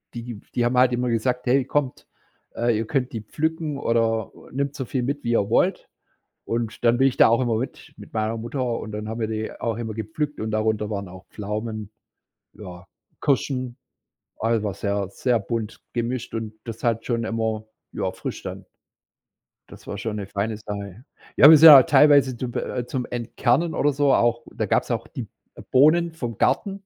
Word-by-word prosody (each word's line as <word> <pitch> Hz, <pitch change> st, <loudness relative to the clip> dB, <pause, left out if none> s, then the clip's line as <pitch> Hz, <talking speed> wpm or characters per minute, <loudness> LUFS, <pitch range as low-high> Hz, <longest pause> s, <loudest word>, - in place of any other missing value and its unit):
die 115 Hz, -3 st, -7 dB
die 120 Hz, -, +2 dB
haben 125 Hz, +1 st, +1 dB
halt 125 Hz, -1 st, +4 dB
immer 125 Hz, 0 st, 0 dB
gesagt: 125 Hz, +2 st, -1 dB
„Hey, 130 Hz, +2 st, +3 dB
kommt, 140 Hz, -2 st, -2 dB, 0.5 s
äh, 120 Hz, 0 st, +1 dB
ihr 110 Hz, +1 st, -2 dB
könnt 130 Hz, -3 st, -1 dB
die 115 Hz, -, -4 dB
pflücken, 155 Hz, +5 st, -2 dB
oder 115 Hz, -4 st, 0 dB, 0.2 s
nehmt 140 Hz, +1 st, -2 dB
so 130 Hz, -, -4 dB
viel 130 Hz, +1 st, -2 dB
mit, 140 Hz, +3 st, -3 dB
wie 120 Hz, -, -1 dB
ihr 100 Hz, -4 st, +2 dB
wollt.“ -, -, +1 dB, 0.6 s
Und 115 Hz, 0 st, -3 dB
dann 120 Hz, +1 st, +4 dB
bin 135 Hz, -, +5 dB
ich 130 Hz, -, -5 dB
da -, -, +7 dB
auch 115 Hz, +2 st, +3 dB
immer 120 Hz, -3 st, +1 dB
mit 125 Hz, +4 st, -6 dB
mit -, -, -13 dB
meiner 110 Hz, 0 st, -1 dB
Mutter 120 Hz, +4 st, -4 dB, 0.2 s
und 110 Hz, -, -7 dB
dann 105 Hz, 0 st, -5 dB
haben 115 Hz, +1 st, -5 dB
wir 110 Hz, -, -1 dB
die 110 Hz, 0 st, -3 dB
auch 115 Hz, -2 st, -1 dB
immer 110 Hz, -2 st, -4 dB
gepflückt, 115 Hz, +8 st, -4 dB
und 110 Hz, -, -3 dB
darunter 110 Hz, 0 st, 0 dB
waren 100 Hz, -2 st, -4 dB
auch 95 Hz, +1 st, -12 dB
Pflaumen, 105 Hz, 0 st, -5 dB, 0.6 s
ja, 90 Hz, -3 st, -11 dB, 0.4 s
Kirschen, 130 Hz, -3 st, -1 dB, 0.6 s
also, 115 Hz, -1 st, +1 dB
war 100 Hz, -3 st, -2 dB
sehr 100 Hz, -1 st, -2 dB
sehr 120 Hz, +2 st, 0 dB
bunt 110 Hz, +1 st, -4 dB
gemischt, 120 Hz, 0 st, -3 dB
und 110 Hz, -1 st, -4 dB
das 115 Hz, 0 st, -8 dB
hat 115 Hz, -1 st, +1 dB
schon 115 Hz, -2 st, -1 dB
immer 110 Hz, -1 st, -2 dB, 0.3 s
ja, -, -, -2 dB
frisch -, -, -6 dB
dann -, -, -7 dB, 1.0 s
Das -, -, -14 dB
war 100 Hz, -, -5 dB
schon 110 Hz, 0 st, -4 dB
'ne 100 Hz, -2 st, -5 dB
feine 105 Hz, +2 st, -2 dB
Sache. 100 Hz, 0 st, -7 dB, 0.3 s
Ja, 145 Hz, -, +9 dB
wir 160 Hz, -, +10 dB
sind 160 Hz, +2 st, +10 dB
auch 140 Hz, -4 st, +11 dB
teilweise 140 Hz, -3 st, +5 dB
zum 120 Hz, 0 st, -5 dB
äh, 120 Hz, -, -3 dB
zum 125 Hz, 0 st, -3 dB
Entkernen 125 Hz, +7 st, 0 dB
oder 145 Hz, 0 st, +1 dB
so 140 Hz, -1 st, +3 dB
auch 120 Hz, 0 st, +2 dB
da -, -, -2 dB
gab's -, -, 0 dB
auch -, -, -2 dB
die -, -, -6 dB
B -, -, -14 dB, 0.3 s
äh, -, -, -10 dB
Bohnen 160 Hz, +5 st, +4 dB
vom 120 Hz, -9 st, -5 dB
Garten. 200 Hz, -2 st, 0 dB
115 Hz, 195 wpm, -23 LUFS, 110-130 Hz, 1.0 s, auch